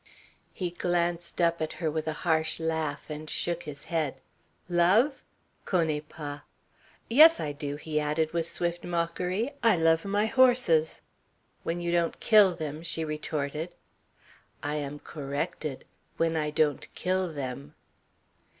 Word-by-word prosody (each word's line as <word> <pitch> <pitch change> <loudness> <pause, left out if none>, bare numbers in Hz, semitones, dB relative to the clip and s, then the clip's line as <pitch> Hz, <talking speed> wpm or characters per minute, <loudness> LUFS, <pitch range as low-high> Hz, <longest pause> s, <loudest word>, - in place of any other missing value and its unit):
He 180 -2 -3
glanced 175 -1 -1
up 170 -1 +2
at 155 - -2
her 160 -2 -2
with 155 0 -3
a 155 - 0
harsh 160 -1 +1
laugh, 160 -3 -2
and 155 0 -6
shook 175 0 -1
his 145 0 -7
head. 160 -5 -2 0.5
"Love? 190 - +3 0.4
Connais 160 -5 +1
pas! 145 -2 -7 0.7
Yes, 315 +7 +8
I 150 - -2
do," 145 0 -4
he 150 +1 -2
added 150 +2 0
with 165 -1 0
swift 175 0 -2
mockery, 180 +7 -1
"I 230 -3 +5
love 165 -1 +3
my 205 +1 +1
horses." 240 -10 +3 0.6
"When 170 +1 -2
you 170 0 -1
don't 170 -1 +1
kill 205 -5 +6
them," 155 -2 -5
she 165 -1 -3
retorted. 155 +1 -3 0.9
"I 145 +1 -1
am 145 0 -4
corrected. 145 0 -4 0.3
When 165 0 +1
I 150 -1 0
don't 150 -2 0
kill 185 -1 0
them." 140 0 -6
165 Hz, 140 wpm, -28 LUFS, 150-175 Hz, 0.9 s, Yes